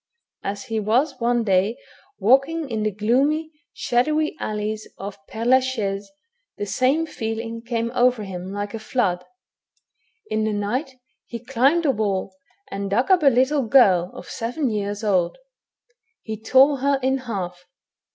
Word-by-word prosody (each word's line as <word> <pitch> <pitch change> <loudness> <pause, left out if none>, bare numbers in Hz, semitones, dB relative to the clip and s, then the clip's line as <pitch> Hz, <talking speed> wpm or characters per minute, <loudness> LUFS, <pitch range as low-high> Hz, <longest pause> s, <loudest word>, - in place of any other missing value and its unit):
As 200 +1 -4
he 225 -1 -2
was 250 +7 +1
one 240 0 +1
day 195 +2 +2 0.4
walking 275 +9 +3
in 220 -1 -1
the 215 - +1
gloomy, 270 +10 +1 0.2
shadowy, 305 +6 0
alleys 215 0 -3
of 200 0 -8
Pdre 225 +1 -5
la 260 +2 +6
Chaise, 205 -6 -3 0.5
the 205 - -3
same 265 +9 +1
feeling 225 -4 -4
came 235 0 -2
over 245 -3 +3
him 185 -1 -6
like 205 +1 -4
a 225 - -4
flood. 200 -6 0 1.0
In 215 0 -1
the 215 0 0
night 250 +7 -2 0.3
he 235 - -5
climbed 270 +7 +2
the 290 - +3
wall, 195 -4 -2 0.4
and 200 0 -3
dug 245 - +1
up 370 -2 +5
a 290 - +4
little 265 +3 +4
girl 190 -9 +5
of - - -9
seven 245 +3 -2
years 205 0 -3
old. 185 -5 +1 0.9
He 220 - -4
tore 265 +6 +4
her 275 +1 +1
in 265 +1 +2
half. 185 -8 -5
230 Hz, 150 wpm, -23 LUFS, 205-260 Hz, 1.0 s, la